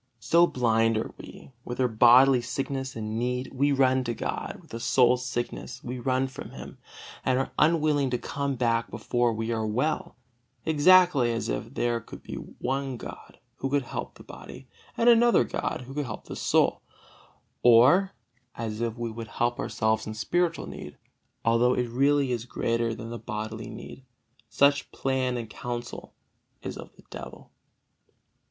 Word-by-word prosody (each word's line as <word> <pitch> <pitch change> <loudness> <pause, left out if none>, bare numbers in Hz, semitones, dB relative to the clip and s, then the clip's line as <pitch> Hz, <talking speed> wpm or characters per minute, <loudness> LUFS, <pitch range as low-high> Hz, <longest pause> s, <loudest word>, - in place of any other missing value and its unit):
So 170 +9 +4
blind 115 -4 +2
are 110 - -3
we: - - -12
with 120 - -6
our 130 - +3
bodily 125 +3 +6
sickness 135 +2 -4
and 110 0 -3
need 125 +1 -2
we 140 +2 +2
run 130 -1 +3
to 120 -1 -2
God; - - -4
with - - -20
the 115 - -5
soul's 125 +1 +3
sickness 120 0 -5
we 125 +1 -5
run 130 +1 +1
from 130 - -9
Him, - - -10 0.4
and 130 -1 +2
are 135 - -1
unwilling 150 -3 +3
to 125 - 0
come 140 +2 -3
back 115 -1 0
before 120 -1 0
we 115 +1 -3
are 110 -1 -1
well, 155 - -1 0.5
exactly 160 -4 +5
as 115 -1 -2
if - - -4
there 120 -1 0
could - - -12
be - - -8
one 135 0 -4
God - - -10 0.2
who 135 - -3
could 140 0 +1
help - - -6
the - - -14
body, - - -11 0.3
and 230 - +2
another 240 0 +6
God - - -3
who 135 - -9
could 145 0 -2
help 105 - -7
the - - -7
soul; - - +2 0.8
or 130 +12 +6 0.4
as 110 -1 -4
if 115 0 -2
we 120 -1 -3
would 115 0 -7
help 120 +1 -1
ourselves 110 0 0
in 110 - -5
spiritual 170 - 0
need, - - -9 0.5
although 115 +2 +3
it 125 -1 0
really 140 +1 +2
is 120 -1 -2
greater 115 -2 -1
than 115 +1 -8
the 120 - -5
bodily 110 +1 -5
need. 115 +3 -10 0.5
Such 140 0 +2
plan 130 -2 -1
and 115 -2 -5
counsel 120 +1 -7 0.5
is - - -5
of - - -10
the - - -19
devil. - - -10
125 Hz, 170 wpm, -27 LUFS, 115-135 Hz, 0.8 s, bodily